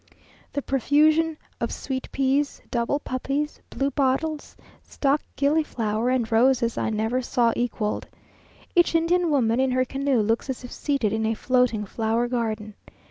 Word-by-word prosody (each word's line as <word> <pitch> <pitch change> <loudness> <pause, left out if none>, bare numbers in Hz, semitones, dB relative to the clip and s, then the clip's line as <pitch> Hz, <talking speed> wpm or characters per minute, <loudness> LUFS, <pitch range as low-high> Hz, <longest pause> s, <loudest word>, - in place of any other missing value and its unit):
The 285 - -2
profusion 305 +4 +3 0.2
of - - -2
sweet 260 -2 -5
peas, 275 +1 +1
double 240 +3 0
poppies, 280 +3 -3
bluebottles, 280 +3 -1 0.3
stock 280 +1 0 0.2
gillyflower, 250 -6 +1
and 245 -3 0
roses, 235 0 +3
I - - -1
never 220 +4 0
saw 240 -2 +1
equalled. 230 -3 -2 0.7
Each 345 -1 +4
Indian 340 +1 +2
woman 245 -5 +2
in 265 0 +2
her 255 0 +1
canoe 270 -2 0
looks 225 +5 0
as 255 -1 -4
if 245 - -9
seated 275 -8 -1
in 220 0 0
a 225 - 0
floating 250 -3 +1
flower 225 +3 0
garden. 220 -3 -2
255 Hz, 140 wpm, -25 LUFS, 230-285 Hz, 0.7 s, Each